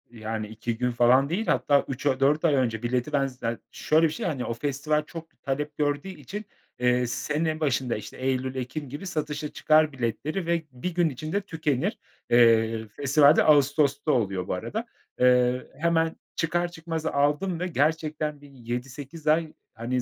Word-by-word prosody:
Yani 110 Hz, -2 st, -5 dB
2 110 Hz, +2 st, -4 dB
gün 125 Hz, +1 st, 0 dB
falan 125 Hz, +3 st, +4 dB
değil, 205 Hz, +7 st, -1 dB
hatta 140 Hz, -1 st, +3 dB
3 135 Hz, +1 st, -6 dB
a 130 Hz, -2 st, +2 dB
4 145 Hz, +4 st, +3 dB
ay 155 Hz, -, +4 dB
önce 120 Hz, -4 st, 0 dB
bileti 125 Hz, +3 st, -1 dB
ben 140 Hz, -1 st, +2 dB
za 120 Hz, -3 st, -4 dB
Şöyle 160 Hz, +2 st, +3 dB
bir -, -, -4 dB
şey: -, -, -4 dB
Hani, 140 Hz, -8 st, -2 dB
o -, -, -2 dB
festival 145 Hz, +4 st, -1 dB
çok 165 Hz, 0 st, -11 dB
talep 145 Hz, +2 st, -3 dB
gördüğü 145 Hz, +2 st, 0 dB
için, 190 Hz, -, -7 dB, 0.3 s
eee, 125 Hz, 0 st, +2 dB
sene 150 Hz, +6 st, -1 dB
başında, 135 Hz, -5 st, 0 dB
işte, 105 Hz, -, -8 dB
eylül, 130 Hz, 0 st, -1 dB
ekim 130 Hz, +3 st, -5 dB
gibi 145 Hz, +8 st, -7 dB
satışa 150 Hz, -3 st, -3 dB
çıkar 155 Hz, 0 st, +4 dB
biletleri 135 Hz, -, -3 dB
ve 170 Hz, -1 st, 0 dB
1 135 Hz, +8 st, -5 dB
gün 175 Hz, -1 st, +2 dB
içinde 155 Hz, +8 st, -3 dB
tükenir. 160 Hz, -, -1 dB, 0.3 s
Eee, 115 Hz, -2 st, +4 dB
festival 140 Hz, +6 st, +4 dB
de -, -, +4 dB
ağustosta 145 Hz, 0 st, +3 dB
oluyor 95 Hz, -7 st, 0 dB
bu -, -, -1 dB
arada. 215 Hz, -, -4 dB, 0.3 s
Eee, 125 Hz, 0 st, +3 dB
hemen 165 Hz, 0 st, +1 dB, 0.2 s
çıkar 175 Hz, +1 st, 0 dB
çıkmaz 165 Hz, -1 st, -5 dB
aldım 150 Hz, +5 st, +1 dB
ve 180 Hz, -, -1 dB
gerçekten 155 Hz, -1 st, -1 dB
bir 145 Hz, -, -14 dB
7-8 135 Hz, +5 st, -7 dB
ay, 155 Hz, +1 st, +2 dB, 0.2 s
hani, 120 Hz, +2 st, -2 dB
145 Hz, 170 wpm, -26 LUFS, 125-155 Hz, 0.3 s, falan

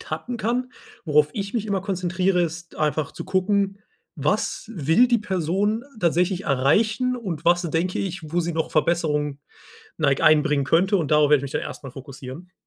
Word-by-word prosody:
tappen 160 Hz, +11 st, -5 dB
kann. 245 Hz, +3 st, -2 dB, 0.3 s
Worauf 150 Hz, -2 st, +3 dB
ich 200 Hz, +2 st, -5 dB
mich 225 Hz, -3 st, 0 dB
immer 200 Hz, -3 st, -1 dB
konzentriere, 185 Hz, -1 st, 0 dB
ist 170 Hz, +1 st, -5 dB
einfach 150 Hz, -1 st, -1 dB
zu -, -, -7 dB
gucken: 195 Hz, +1 st, 0 dB, 0.4 s
Was 150 Hz, +9 st, -1 dB
will 165 Hz, -, +4 dB
die 240 Hz, -1 st, +2 dB
Person 200 Hz, +4 st, -1 dB, 0.2 s
tatsächlich 180 Hz, +2 st, +1 dB
erreichen? 210 Hz, -, +2 dB
Und 185 Hz, -10 st, -5 dB
was 175 Hz, +1 st, +4 dB
denke 170 Hz, +2 st, -1 dB
ich, 170 Hz, -5 st, -5 dB
wo 175 Hz, -, +2 dB
sie 170 Hz, 0 st, -2 dB
noch 160 Hz, 0 st, -2 dB
Verbesserung 150 Hz, -3 st, 0 dB, 0.6 s
neig 140 Hz, -4 st, +1 dB
einbringen 150 Hz, -2 st, +4 dB
könnte? 185 Hz, +8 st, +3 dB
Und 160 Hz, -5 st, -2 dB
darauf 150 Hz, -1 st, +4 dB
werde 150 Hz, -, +7 dB
ich -, -, -6 dB
mich 140 Hz, -1 st, -6 dB
dann -, -, -1 dB
erstmal 135 Hz, -, -7 dB
fokussieren. 135 Hz, +6 st, -10 dB
175 Hz, 170 wpm, -23 LUFS, 150-195 Hz, 0.6 s, werde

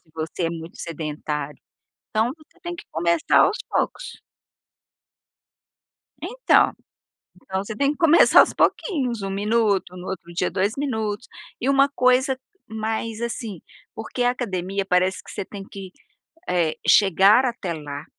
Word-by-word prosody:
Se 160 Hz, -, -30 dB
você 160 Hz, +2 st, -4 dB
é 165 Hz, -, 0 dB
muito 165 Hz, 0 st, -8 dB
sedentário, 150 Hz, -2 st, -5 dB, 0.5 s
então 220 Hz, +3 st, +1 dB
você 320 Hz, +3 st, -24 dB
tem 345 Hz, 0 st, -5 dB
que -, -, -11 dB
começar 170 Hz, 0 st, +2 dB
aos 425 Hz, -, +4 dB
poucos. -, -, -2 dB, 2.0 s
Então, -, -, +3 dB, 0.7 s
então 190 Hz, +1 st, -3 dB
você 215 Hz, +1 st, -6 dB
tem 280 Hz, +4 st, +1 dB
que -, -, -10 dB
começar 330 Hz, 0 st, +7 dB
aos -, -, +4 dB
pouquinhos, 255 Hz, -, 0 dB
1 195 Hz, -, -3 dB
minuto, 205 Hz, -2 st, 0 dB
no 180 Hz, -, -8 dB
outro 170 Hz, -2 st, -6 dB
dia -, -, 0 dB
2 195 Hz, +4 st, 0 dB
minutos 220 Hz, -6 st, -2 dB, 0.3 s
e 255 Hz, -, -1 dB
uma 275 Hz, 0 st, +5 dB
coisa 260 Hz, 0 st, +2 dB, 0.3 s
mais, 220 Hz, 0 st, -3 dB
assim. 230 Hz, -6 st, -4 dB, 0.3 s
Porque 225 Hz, +3 st, -4 dB
a 245 Hz, -, +4 dB
academia 195 Hz, -5 st, -3 dB
parece 185 Hz, 0 st, +1 dB
que -, -, -13 dB
você -, -, -5 dB
tem 195 Hz, 0 st, -9 dB
que, 195 Hz, -1 st, -9 dB, 0.6 s
eh, 170 Hz, -3 st, +1 dB
chegar 200 Hz, +5 st, +6 dB
até 235 Hz, -8 st, -2 dB
lá, 145 Hz, -2 st, -7 dB
205 Hz, 145 wpm, -23 LUFS, 180-245 Hz, 2.0 s, começar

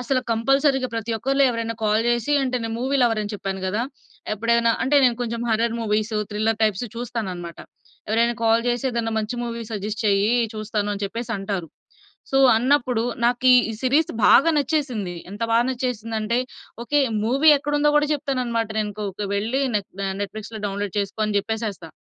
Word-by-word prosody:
అసలు 255 Hz, +1 st, 0 dB
కంపల్సరీగా 270 Hz, +3 st, +2 dB
ప్రతి 225 Hz, 0 st, -3 dB
ఒక్కరిలో 275 Hz, +4 st, +1 dB
ఎవరైనా 230 Hz, -1 st, -3 dB
కాల్ 215 Hz, +1 st, +2 dB
జేసి 240 Hz, +3 st, 0 dB
అంటే 255 Hz, -1 st, -1 dB
నేను 225 Hz, 0 st, -3 dB
మూవీ 265 Hz, +3 st, 0 dB
లవర్ 225 Hz, -3 st, +2 dB
అని 205 Hz, +1 st, -5 dB
చెప్పాను 195 Hz, -1 st, -4 dB
గదా! 210 Hz, +5 st, -1 dB, 0.5 s
ఎప్పుడైనా 230 Hz, +2 st, +2 dB
అంటే, 270 Hz, +3 st, +2 dB
నేను 245 Hz, -2 st, +3 dB
కొంచెం 235 Hz, -1 st, -3 dB
హారర్ 230 Hz, +1 st, +1 dB
మూవీస్, 215 Hz, 0 st, -1 dB, 0.2 s
థ్రిల్లర్ 215 Hz, +1 st, 0 dB
టైప్స్ 215 Hz, +1 st, +1 dB
చూస్తాననమాట. 195 Hz, -8 st, -5 dB, 0.5 s
ఎవరైనా 235 Hz, +2 st, +2 dB
కాల్ 225 Hz, +1 st, +4 dB
జేసి, 245 Hz, +2 st, 0 dB
"ఏదైనా 230 Hz, -2 st, -2 dB
మంచి 215 Hz, +3 st, -3 dB
మూవీ 235 Hz, -1 st, -4 dB
సజెస్ట్ 210 Hz, +1 st, -4 dB
చెయ్యి." 205 Hz, +3 st, +3 dB, 0.2 s
చూస్తాను 215 Hz, -1 st, -2 dB
అని 205 Hz, -, -5 dB
చెప్పేసంటారు. 200 Hz, -5 st, -4 dB, 0.6 s
సో, 270 Hz, -, +2 dB, 0.2 s
అన్నప్పుడు, 250 Hz, -2 st, +2 dB, 0.2 s
నాకు 245 Hz, +2 st, +1 dB
ఈ -, -, +9 dB, 0.3 s
సీరీస్ 285 Hz, +5 st, +2 dB, 0.2 s
బాగా 330 Hz, +4 st, +6 dB
నచ్చేసింది. 255 Hz, -, -1 dB, 0.2 s
ఎంత 205 Hz, +2 st, -9 dB
బాగా 235 Hz, +2 st, +3 dB
నచ్చేసిందంటే 230 Hz, -2 st, -2 dB, 0.5 s
ఓకే. 290 Hz, +4 st, +2 dB, 0.2 s
మూవీ 275 Hz, +7 st, +3 dB
ఎక్కడుందో 290 Hz, +1 st, +1 dB
గూడా 295 Hz, 0 st, +3 dB
చెప్తాననమాట. 250 Hz, -6 st, -2 dB
నేనుకోక 205 Hz, -1 st, -3 dB
వెళ్లి 225 Hz, +7 st, 0 dB
నెట్ 205 Hz, -2 st, -1 dB
దా 195 Hz, -, -1 dB
నెట్‌ఫ్లిక్స్‌లో 215 Hz, +2 st, -7 dB
డౌన్లోడ్ 200 Hz, -1 st, -4 dB
చేసుకో 200 Hz, +2 st, -2 dB
అని 210 Hz, -1 st, -1 dB
జెప్పేసేస్తా. 205 Hz, -5 st, -4 dB
230 Hz, 160 wpm, -23 LUFS, 210-250 Hz, 0.6 s, ఈ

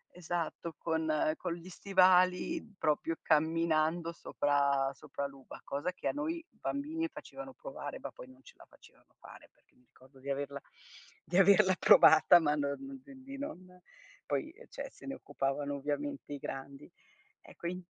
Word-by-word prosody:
Esatto, 170 Hz, -1 st, -4 dB
con 160 Hz, -1 st, -1 dB, 0.3 s
con 180 Hz, -2 st, -3 dB
gli 175 Hz, +1 st, -11 dB
stivali 185 Hz, -, +3 dB
proprio 155 Hz, +1 st, 0 dB
camminando 160 Hz, +1 st, +2 dB
sopra 140 Hz, -4 st, +1 dB
sopra 140 Hz, +1 st, -6 dB
l'uva. 135 Hz, -1 st, -12 dB
Cosa 145 Hz, +6 st, -2 dB
che -, -, -5 dB
a -, -, +2 dB
noi 320 Hz, +3 st, -3 dB
bambini 315 Hz, +4 st, -3 dB
facevano 270 Hz, 0 st, -9 dB
provare -, -, -7 dB
ma -, -, -7 dB
poi -, -, -12 dB
non 130 Hz, 0 st, -18 dB
ce -, -, -15 dB
la -, -, -15 dB
facevano -, -, -22 dB
fare -, -, -14 dB
perché -, -, -35 dB
mi 125 Hz, -, -28 dB
ricordo 130 Hz, +2 st, -20 dB
di 135 Hz, +2 st, -8 dB
averla 140 Hz, 0 st, -3 dB, 0.6 s
di 175 Hz, -, -1 dB
averla 195 Hz, 0 st, +6 dB
provata 160 Hz, +3 st, +8 dB
ma 150 Hz, -3 st, +2 dB
non 205 Hz, -, -4 dB
cioè 275 Hz, -1 st, -13 dB
di 275 Hz, +1 st, -8 dB
non 185 Hz, -10 st, -8 dB, 0.5 s
poi, 315 Hz, -, -2 dB
ehm, 480 Hz, +8 st, -16 dB
cioè, -, -, -6 dB
se -, -, -15 dB
ne 275 Hz, -, -3 dB
occupavano 145 Hz, 0 st, -2 dB
ovviamente 145 Hz, 0 st, -4 dB
i 145 Hz, -, -4 dB
grandi. 135 Hz, +1 st, -7 dB, 0.5 s
Ecco, 170 Hz, -, -8 dB
in 180 Hz, +1 st, -4 dB
165 Hz, 160 wpm, -32 LUFS, 140-195 Hz, 0.6 s, provata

